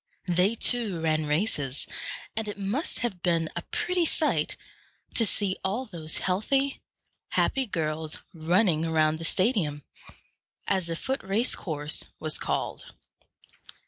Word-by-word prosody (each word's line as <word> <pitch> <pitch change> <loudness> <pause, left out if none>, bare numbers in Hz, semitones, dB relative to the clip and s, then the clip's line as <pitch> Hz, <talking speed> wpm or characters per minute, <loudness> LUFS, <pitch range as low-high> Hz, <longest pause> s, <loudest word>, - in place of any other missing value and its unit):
They 180 +5 +3
too 225 -7 +2
ran 155 -1 0
races; 150 - 0 0.5
and 220 -1 -2
it 205 - -5
must 205 - -2
have 190 -7 -4
been 165 -3 +1
a 175 - -2
pretty 360 - 0
sight 310 - +3 0.6
to 225 - +5
see 200 -2 +1
all 210 +7 -1
those 165 -7 -4
healthy, 270 +9 0 0.5
happy 265 -2 +1
girls 155 -3 -2 0.2
running 170 0 +2
around 155 -1 +2
the - - -6
stadium, 175 - +1 0.8
as 190 -3 0
the 165 - -2
foot 265 +10 -2
race 205 +6 +2
course 150 -3 +1
was 155 0 0
called. - - -3
180 Hz, 130 wpm, -27 LUFS, 160-220 Hz, 0.8 s, to